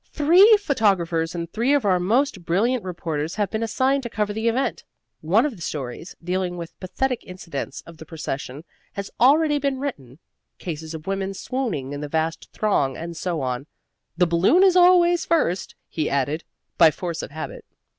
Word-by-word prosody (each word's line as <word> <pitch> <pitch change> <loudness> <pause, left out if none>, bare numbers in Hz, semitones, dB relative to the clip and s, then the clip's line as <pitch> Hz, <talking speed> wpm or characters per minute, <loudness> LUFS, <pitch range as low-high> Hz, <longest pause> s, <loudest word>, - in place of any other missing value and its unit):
"Three 365 +9 +6
photographers 180 - +1
and 170 -1 -3
three 235 - +1
of 280 - 0
our 185 -2 +3
most 220 +2 +1
brilliant 220 +9 +1
reporters 165 -3 -4
have 205 -3 -1
been 220 - -2
assigned 260 +5 +1
to 240 - -6
cover 210 -2 -1
the 220 +2 -2
event. 250 +4 0 0.4
One 195 - +3
of 285 -6 -3
the 175 - -14
stories, 140 +1 -5
dealing 180 0 -2
with 170 -1 -7
pathetic 245 +7 -2
incidents 165 -7 -6
of 170 -1 -13
the 160 - -11
procession, 150 -3 -5 0.3
has 200 0 -6
already 295 +4 +4
been 275 -1 -1
written 140 - -6 0.4
cases 160 -1 -6
of 155 - -9
women 195 0 -2
swooning 195 - -3
in 145 - -5
the 150 - -4
vast 160 +1 -2
throng, 140 -11 0
and 170 +1 -6
so 170 -1 -2
on. 130 +2 -3 0.5
The 180 - +4
Balloon 175 - +4
is 375 -2 +5
always 350 -1 +5
first," 195 - 0
he 155 -2 -2
added, 140 +4 -1 0.3
by 165 -2 +8
force 165 +1 -4
of - - -7
habit. 155 +2 -7
185 Hz, 175 wpm, -23 LUFS, 160-255 Hz, 0.5 s, by